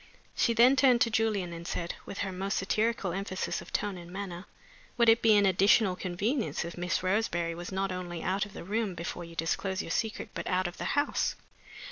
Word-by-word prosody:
She 230 - +2
then 245 +4 +7
turned 255 -3 +5
to 230 - +3
Julian, 210 -6 0
and 170 +1 -7
said, 170 -2 -3
with 200 - -7
her 195 - -4
most 195 +2 -2
satirical 215 0 0
emphasis 190 0 -3
of - - -12
tone 200 -3 -2
and 170 0 -11
manner: 190 -1 -6 0.5
"Would 235 -1 +5
it 225 +1 +5
be 220 -2 +6
an 205 - +4
additional 195 +1 +4
convenience 200 - -1
if 170 - -7
Miss 175 0 -1
Roseberry 185 -4 0
was 175 +2 -7
not 190 0 -1
only 175 -2 -5
out 190 +2 0
of 200 - -16
the - - -8
room 205 0 -1
before 170 +1 -5
you 165 0 -12
disclose 185 +4 -1
your - - -6
secret, 220 +4 -2
but - - -5
out 185 0 +1
of 175 +1 -5
the - - -3
house?" 290 +1 +1
190 Hz, 210 wpm, -30 LUFS, 175-220 Hz, 0.5 s, then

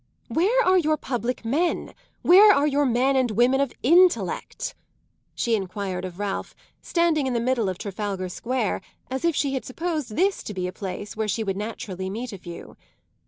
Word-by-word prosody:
"Where 450 +9 +2
are 370 0 +5
your 310 -2 +1
public 245 -3 -3
men, 315 +9 0 0.3
where 400 +4 +8
are 290 -7 +3
your 290 -1 +2
men 255 +3 +2
and 260 -2 +2
women 245 +5 +3
of 280 -3 0
intellect?" 350 +6 +2 0.6
she 235 - 0
enquired 190 -2 -2
of 180 -1 -8
Ralph, 205 -1 -4 0.3
standing 335 -5 +1
in 255 - -1
the 235 - +1
middle 235 -4 +1
of 185 - -4
Trafalgar 195 -2 -4
Square 235 +2 -2 0.3
as 265 +3 -3
if 335 -2 +2
she 280 -2 0
had 265 - -2
supposed 305 -5 -3
this 390 +2 +2
to 210 - -7
be 185 -1 -2
a 180 - -4
place 200 +1 -6
where 220 0 -1
she 220 +2 -1
would 195 -2 -2
naturally 195 -3 -5
meet 225 +4 -5
a 195 - -8
few. 170 -1 -10
245 Hz, 185 wpm, -24 LUFS, 200-300 Hz, 0.6 s, where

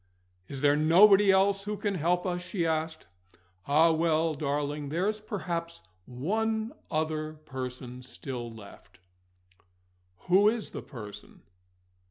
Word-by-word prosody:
"Is 135 -2 -7
there 145 0 +4
nobody 195 +6 +6
else 195 +1 +2
who 210 0 -3
can 205 -1 -1
help 175 +1 0
us?" 180 -1 -2
she 180 -1 -2
asked. 160 0 -2 0.6
"Ah, 160 +4 +5
well, 160 0 +1
darling, 145 0 -2
there's 200 +7 -1
perhaps 170 -5 -4 0.2
one 220 - -1 0.2
other 155 0 -2
person 130 -4 -7
still 125 -1 -7
left," 100 -4 -14 1.2
"Who 195 +4 +5
is 225 -2 -3
the - - -6
person?" 105 -7 -11
160 Hz, 120 wpm, -29 LUFS, 145-190 Hz, 1.2 s, nobody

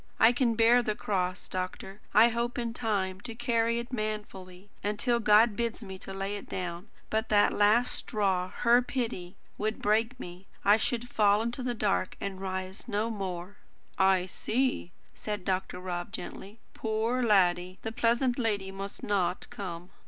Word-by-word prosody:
I 225 - +7
can 240 -2 +1
bear 235 +2 +5
the 215 -3 -1
cross, 185 -3 -2
doctor; 185 +2 -5
I 225 +3 +7
hope 235 +1 -2
in 235 -1 -2
time 200 -5 -1
to 230 - -7
carry 235 -1 +1
it 235 +2 -5
manfully, 205 -4 -5
until 225 +4 +1
God 215 0 +5
bids 235 0 -2
me 190 -2 -8
lay 195 +1 -3
it 200 - -11
down. 180 +2 -5 0.2
But 220 0 0
that 205 -1 +4
last 215 +4 +4
straw 190 -4 -1
HER 240 +4 +4
pity 225 -8 -4 0.2
would 215 +1 -1
break 225 +4 +1
me. 180 -1 -9 0.2
I 205 +2 +7
should 240 +1 -1
fall 210 -2 +3
in 235 - -1
the 245 0 -3
dark, 205 -3 0
to 200 - -3
rise 190 +2 -5
no 220 0 -1
more." 190 -2 -5 0.4
"I 190 -1 +3
see," 240 +1 -1 0.2
said 210 -3 -5
Dr. 185 -1 -1
Rob 180 0 -4
gently. 210 -1 -7 0.2
"Poor 225 +3 -1
laddie! 185 -5 +3
The 225 - -3
pleasant 240 +3 +1
lady 205 -5 0
must 195 +1 -7
not 185 -3 0
come." 185 -5 -6
210 Hz, 160 wpm, -29 LUFS, 190-230 Hz, 0.4 s, I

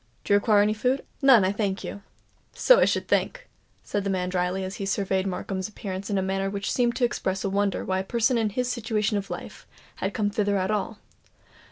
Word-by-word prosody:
Do - - +1
you - - +7
require 205 -1 +4
any 210 +1 +2
food?" 250 +5 0 0.2
"None, 260 -8 +6
I 190 - +2
thank 200 -2 -2
you." 200 - -6 0.5
"So - - +6
I - - +5
should - - 0
think," - - 0 0.4
said 205 - -2
the 200 - -2
man 180 -1 -1
drily, 180 +1 -1
as 190 +1 -5
he 200 - -4
surveyed 195 -1 0
Markham's 190 +1 -3
appearance 195 -2 -6
in 200 - 0
a 190 - +1
manner 195 +1 -1
which 200 0 -3
seemed 240 -1 +1
to 250 - +2
express 190 -5 -2
a 195 - -1
wonder 200 0 0
why 185 0 0
a - - -2
person 235 +4 +1
in 225 -2 +1
his 250 +5 -2
situation 220 -3 -1
of 195 - -8
life - - -8 0.3
had - - -3
come 210 -3 0
thither 205 -1 +1
at 190 +2 0
all. 215 +1 -2
200 Hz, 225 wpm, -26 LUFS, 190-220 Hz, 0.5 s, you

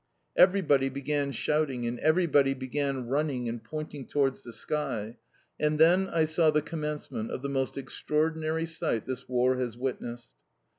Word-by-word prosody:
Everybody 160 -8 +4
began 140 +1 -1
shouting 135 -1 0
and 120 +1 -3
everybody 150 -4 +3
began 135 0 -2
running 135 -1 -1
and 115 0 -4
pointing 155 -3 -6
towards 135 -2 +1
the 120 - -9
sky; 115 -3 -3 0.4
and 150 0 +1
then 175 +5 +5
I 160 -1 +2
saw 160 +1 +3
the 150 -1 +2
commencement 150 -7 -4
of 130 - -5
the 140 - -2
most 135 -1 -1
extraordinary 155 +4 -1
sight 165 -9 -2
this 130 -1 -5
war 125 +1 +2
has 120 -3 -3
witnessed. 120 - -5
140 Hz, 150 wpm, -29 LUFS, 125-155 Hz, 0.4 s, then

